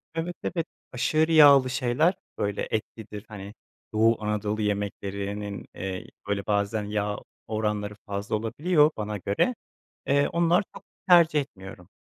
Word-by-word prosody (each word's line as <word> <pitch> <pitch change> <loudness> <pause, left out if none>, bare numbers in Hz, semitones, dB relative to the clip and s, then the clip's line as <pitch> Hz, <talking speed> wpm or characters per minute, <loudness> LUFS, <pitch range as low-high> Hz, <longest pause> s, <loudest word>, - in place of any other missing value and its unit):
Evet, 170 +2 -3
evet 170 -2 -2 0.2
aşırı 155 +6 +1
yağlı 140 -4 +8
şeyler, 125 +8 +2 0.2
böyle, 100 0 -2
etlidir 110 -1 -5
hani 100 -1 -9 0.4
Doğu 110 0 +3
Anadolu 105 0 -1
yemeklerinin, 100 0 -3
eee, 95 0 -5 0.2
böyle 100 -1 -1
bazen 105 +1 0
yağ 105 0 -2 0.3
oranları 105 -1 -2
fazla 100 +1 -3
olabiliyor 150 +8 +2
bana 105 -1 -3
göre. 100 - 0 0.5
Eee, 140 +1 +3
onlar 170 +3 +2
çok - - -11 0.2
tercih 165 -4 +6
etmiyorum. 95 -8 -11
105 Hz, 125 wpm, -26 LUFS, 100-145 Hz, 0.5 s, yağlı